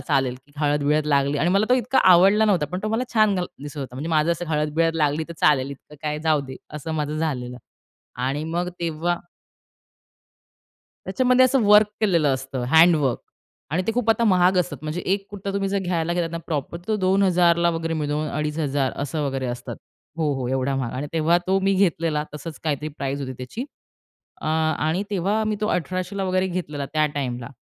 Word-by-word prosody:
चालेल 130 Hz, -2 st, 0 dB
की 145 Hz, -, -25 dB
हळद-बिळद 150 Hz, 0 st, +1 dB
लागली 140 Hz, -1 st, +2 dB
आणि 155 Hz, -, +2 dB
मला 200 Hz, +3 st, +3 dB
तो 250 Hz, -, +5 dB
इतका 255 Hz, +1 st, +1 dB
आवडला 195 Hz, +5 st, +5 dB
नव्हता. 185 Hz, -8 st, +2 dB
पण 180 Hz, -, -4 dB
तो 215 Hz, -, -1 dB
मला 225 Hz, +3 st, 0 dB
छान 215 Hz, -2 st, +4 dB
घाल 180 Hz, -1 st, -1 dB, 0.2 s
दिसत 145 Hz, +1 st, -8 dB
होता 130 Hz, -3 st, -6 dB
म्हणजे 145 Hz, +5 st, -5 dB
माझं 160 Hz, +1 st, +3 dB
असं 170 Hz, +1 st, -4 dB
हळद-बिळद 155 Hz, +1 st, +1 dB
लागली, 150 Hz, 0 st, +1 dB
तर -, -, -6 dB
चालेल 140 Hz, -3 st, +3 dB
इतकं 140 Hz, +2 st, -12 dB
काय 150 Hz, -1 st, -2 dB
जाऊ 155 Hz, -2 st, +2 dB
दे 130 Hz, 0 st, -8 dB, 0.2 s
असं 150 Hz, +2 st, -5 dB
माझं 150 Hz, 0 st, -2 dB
झालेलं 125 Hz, -6 st, -3 dB, 0.7 s
आणि 145 Hz, +3 st, -2 dB
मग 175 Hz, +1 st, 0 dB
तेव्हा 170 Hz, +1 st, -1 dB, 1.9 s
त्याच्यामध्ये 255 Hz, 0 st, +4 dB
असं 255 Hz, 0 st, +3 dB
वर्क 210 Hz, +1 st, +7 dB
केलेलं 170 Hz, -10 st, +3 dB
असतं 130 Hz, -1 st, -4 dB
हँडवर्क 160 Hz, -4 st, +5 dB, 0.5 s
आणि 170 Hz, +5 st, 0 dB
ते 225 Hz, -, +1 dB
खूप 235 Hz, -1 st, +1 dB
आता 225 Hz, +1 st, +2 dB
महाग 185 Hz, -3 st, +4 dB
असतात. 175 Hz, -4 st, -1 dB
म्हणजे 155 Hz, +3 st, -3 dB
एक 195 Hz, 0 st, -1 dB
कुर्ता 200 Hz, -1 st, -5 dB
तुम्ही 195 Hz, 0 st, -1 dB
जर 200 Hz, +1 st, 0 dB
घ्यायला 175 Hz, -3 st, -1 dB
घेतला 175 Hz, -1 st, 0 dB
ना, 170 Hz, -, -4 dB
प्रॉपर 155 Hz, +1 st, -3 dB
तो 220 Hz, -, +1 dB
2000 180 Hz, -3 st, +3 dB
वगैरे 165 Hz, 0 st, -2 dB
मिळून 150 Hz, 0 st, -2 dB
2500 150 Hz, -2 st, -1 dB
असं 145 Hz, +2 st, -2 dB
वगैरे 135 Hz, -1 st, -2 dB
असतात. 120 Hz, 0 st, -5 dB, 0.4 s
हो, 155 Hz, -3 st, +1 dB
हो 130 Hz, -2 st, -3 dB
एवढा 130 Hz, +1 st, 0 dB
महाग. 125 Hz, -3 st, -2 dB
आणि 140 Hz, +3 st, -3 dB
तेव्हा 165 Hz, +1 st, +3 dB
तो 190 Hz, +1 st, +2 dB
मी 195 Hz, +1 st, +2 dB
घेतलेला 165 Hz, -5 st, +1 dB
तसंच 150 Hz, 0 st, -7 dB
काहीतरी 150 Hz, -1 st, -1 dB
प्राईस 140 Hz, -2 st, -4 dB
होती 130 Hz, -1 st, -4 dB
त्याची. 130 Hz, -, -5 dB, 0.8 s
अ -, -, -6 dB
आणि 160 Hz, +2 st, 0 dB
तेव्हा 200 Hz, +3 st, 0 dB
मी 215 Hz, -1 st, -1 dB
तो 210 Hz, -, 0 dB
1800 185 Hz, +3 st, -2 dB
वगैरे 185 Hz, 0 st, +1 dB
घेतलेला 160 Hz, -6 st, -4 dB
त्या 155 Hz, -1 st, +3 dB
टाईमला. 125 Hz, -4 st, -3 dB
160 Hz, 190 wpm, -23 LUFS, 145-185 Hz, 1.9 s, वर्क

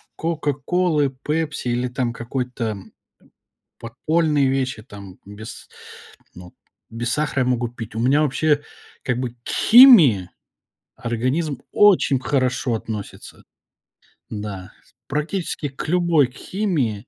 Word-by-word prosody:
"Кока-Колы", 160 Hz, 0 st, 0 dB
"Пепси" 150 Hz, +2 st, -3 dB
или 125 Hz, +1 st, 0 dB
там 125 Hz, -1 st, -2 dB
какой-то 120 Hz, -2 st, -4 dB, 1.0 s
подпольные 150 Hz, +4 st, 0 dB
вещи 130 Hz, -4 st, -2 dB
там 100 Hz, -5 st, -12 dB
без 105 Hz, +2 st, -10 dB, 0.7 s
ну, 90 Hz, 0 st, -13 dB, 0.3 s
без 120 Hz, +1 st, -3 dB
сахара 145 Hz, -2 st, 0 dB
я -, -, +1 dB
могу 120 Hz, -1 st, 0 dB
пить. 115 Hz, -2 st, -9 dB
У 110 Hz, -, -4 dB
меня 135 Hz, +5 st, +3 dB
вообще, 150 Hz, +1 st, +1 dB, 0.4 s
как 125 Hz, -1 st, -1 dB
бы, 125 Hz, -2 st, -3 dB
к -, -, -11 dB
химии 180 Hz, -, +7 dB, 0.7 s
организм 130 Hz, +5 st, -2 dB
очень 195 Hz, -9 st, +4 dB
хорошо 130 Hz, -2 st, 0 dB
относится 110 Hz, -2 st, -7 dB, 0.9 s
Да. 105 Hz, -3 st, -7 dB, 0.4 s
Практически 150 Hz, +1 st, -3 dB
к 135 Hz, +3 st, -7 dB
любой 170 Hz, -5 st, +2 dB
химии 135 Hz, -, -2 dB
130 Hz, 110 wpm, -21 LUFS, 115-150 Hz, 1.0 s, химии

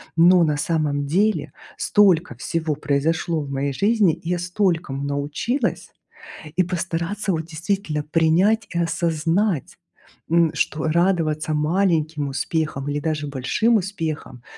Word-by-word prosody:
но 175 Hz, +2 st, +6 dB
на 150 Hz, -1 st, +1 dB
самом 145 Hz, -2 st, 0 dB
деле 160 Hz, -2 st, +1 dB, 0.3 s
столько 180 Hz, -, +3 dB
всего 155 Hz, +5 st, -2 dB
произошло 150 Hz, +3 st, 0 dB
в 140 Hz, -, -7 dB
моей 140 Hz, +1 st, -1 dB
жизни. 200 Hz, -, +2 dB
Я 175 Hz, +1 st, -1 dB
столькому 175 Hz, -6 st, -1 dB
научилась. 145 Hz, -, -2 dB, 0.7 s
И 185 Hz, -, +5 dB
постараться 180 Hz, +3 st, -2 dB
вот 160 Hz, -2 st, -2 dB
действительно 165 Hz, -1 st, -2 dB
принять 165 Hz, +8 st, +2 dB
и -, -, +1 dB
осознать, 165 Hz, -, 0 dB, 0.5 s
м, 165 Hz, -1 st, +3 dB
что 155 Hz, 0 st, -1 dB
радоваться 160 Hz, -2 st, +1 dB
маленьким 155 Hz, -2 st, +1 dB
успехам 145 Hz, 0 st, -2 dB
или 145 Hz, 0 st, -1 dB
даже 155 Hz, -1 st, -2 dB
большим 140 Hz, -, +1 dB
успехам, 160 Hz, -, -4 dB
160 Hz, 120 wpm, -22 LUFS, 150-180 Hz, 0.7 s, но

